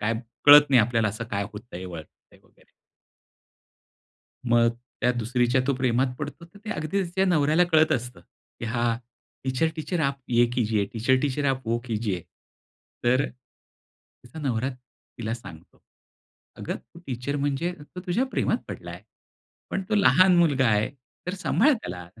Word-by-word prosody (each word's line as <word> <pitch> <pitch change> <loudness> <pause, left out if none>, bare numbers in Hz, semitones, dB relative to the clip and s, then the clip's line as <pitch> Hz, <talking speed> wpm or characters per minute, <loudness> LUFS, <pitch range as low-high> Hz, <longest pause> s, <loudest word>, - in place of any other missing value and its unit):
काय 110 +2 0 0.3
कळत 145 0 +9
नाही 130 -3 +7
आपल्याला 115 0 +1
असं 110 +3 -5
काय 100 0 -1
होतंय 105 -4 -9
वळतंय 85 -4 -11
वगैरे. - - -27 1.9
मग 115 0 +5 0.3
त्या 125 -1 +3
दुसरीच्या 120 +2 +1
तो 140 - +2
प्रेमात 130 0 +1
पडतो, 150 +3 -6
तर 190 +4 -17
ते 220 - -5
अगदी 175 +2 -1
तिच्या 190 +2 0
नवऱ्याला 160 -1 +3
कळत 155 0 +5
असतं, 125 0 -3
की - - -14
हा 120 0 0 0.5
"टीचर 130 +5 +1
टीचर 165 +2 -2
आप 140 -2 0
ये 120 0 +4
कीजिए, 110 -4 +1
टीचर 120 +3 +2
टीचर 145 0 -1
आप 130 -3 -4
वो 115 +1 +1
कीजिये," 105 -7 -2 0.8
तर 130 +3 +4
अ, - - -3 1.0
तिचा 120 +6 -11
नवरा 130 -3 -1
तिला 120 -3 -8
सांगतो, 85 -8 -13 0.8
"अगं, - - -4
तू 170 - -17
टीचर 130 +3 -3
म्हणजे 145 +5 -1
तो 175 +5 -10
तुझ्या 205 +9 +1
प्रेमात - - +1
पडला - - -7
आहे. - - -9 0.7
पण 195 - -1
तो 220 - +1
लहान 185 -3 +5
मुलगा 145 -7 +3
आहे, 105 +3 +2 0.4
तर 180 - -2
सांभाळ 275 +9 +3
त्याला. 90 - -5
अ, - - -16
130 Hz, 155 wpm, -25 LUFS, 115-155 Hz, 1.9 s, कळत